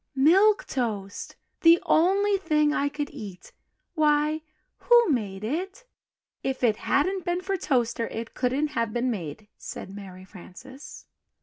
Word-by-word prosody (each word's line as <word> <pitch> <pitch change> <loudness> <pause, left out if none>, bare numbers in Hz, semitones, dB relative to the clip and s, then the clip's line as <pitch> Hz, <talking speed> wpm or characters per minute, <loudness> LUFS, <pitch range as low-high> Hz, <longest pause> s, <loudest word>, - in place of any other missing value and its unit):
"Milk 380 +10 +4
Toast! 210 -6 -4 0.3
the 335 +1 +7
only 395 +5 +3
thing 300 -6 +1
I 285 -1 0
could 290 0 -4
eat! 190 -4 -10 0.4
why 305 -1 +2 0.4
who 475 -4 +4
made 205 -6 -2
it?" 375 - -4 0.6
"If 265 -1 -3
it 220 -3 +3
hadn't 370 +6 0
been 350 0 -1
for 390 +1 -2
Toaster, 240 -8 0
it 225 +1 -6
couldn't 270 +4 0
have 230 -7 -2
been 245 +1 0
made," 195 0 -6
said 190 - -8
Mary 190 -2 -10
Frances. 260 - -12
280 Hz, 135 wpm, -26 LUFS, 220-340 Hz, 0.6 s, the